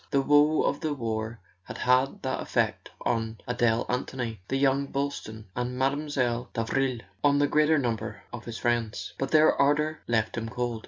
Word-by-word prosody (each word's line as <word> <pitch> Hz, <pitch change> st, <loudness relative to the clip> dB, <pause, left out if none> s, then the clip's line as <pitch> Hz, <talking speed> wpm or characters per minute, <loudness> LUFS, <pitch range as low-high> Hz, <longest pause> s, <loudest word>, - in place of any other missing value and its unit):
The 140 Hz, -, +2 dB
woe 145 Hz, +2 st, +4 dB
of 145 Hz, -, 0 dB
the 155 Hz, -2 st, -2 dB
war 110 Hz, -2 st, -3 dB, 0.3 s
had -, -, -7 dB
had 130 Hz, +2 st, +2 dB
that -, -, -1 dB
effect -, -, -1 dB
on 115 Hz, -1 st, -1 dB
Adele 120 Hz, -1 st, +1 dB
Anthony, 125 Hz, -3 st, -3 dB
on 135 Hz, -, +2 dB
young 135 Hz, 0 st, +2 dB
Boylston, 135 Hz, -6 st, -4 dB
on 125 Hz, +1 st, -2 dB
Mile. 130 Hz, -3 st, 0 dB
Davril, 125 Hz, +1 st, 0 dB, 0.2 s
on 145 Hz, 0 st, +4 dB
the 145 Hz, -, +4 dB
greater 155 Hz, +1 st, +4 dB
number 120 Hz, -5 st, -2 dB
of -, -, -7 dB
his 115 Hz, -1 st, -5 dB
friends. 120 Hz, -2 st, -1 dB
But 135 Hz, -, -1 dB
their 155 Hz, 0 st, +6 dB
ardour 150 Hz, +2 st, +2 dB
left 110 Hz, -2 st, +1 dB
him 115 Hz, 0 st, -5 dB
cold. 120 Hz, -1 st, -2 dB
125 Hz, 170 wpm, -27 LUFS, 115-140 Hz, 0.3 s, their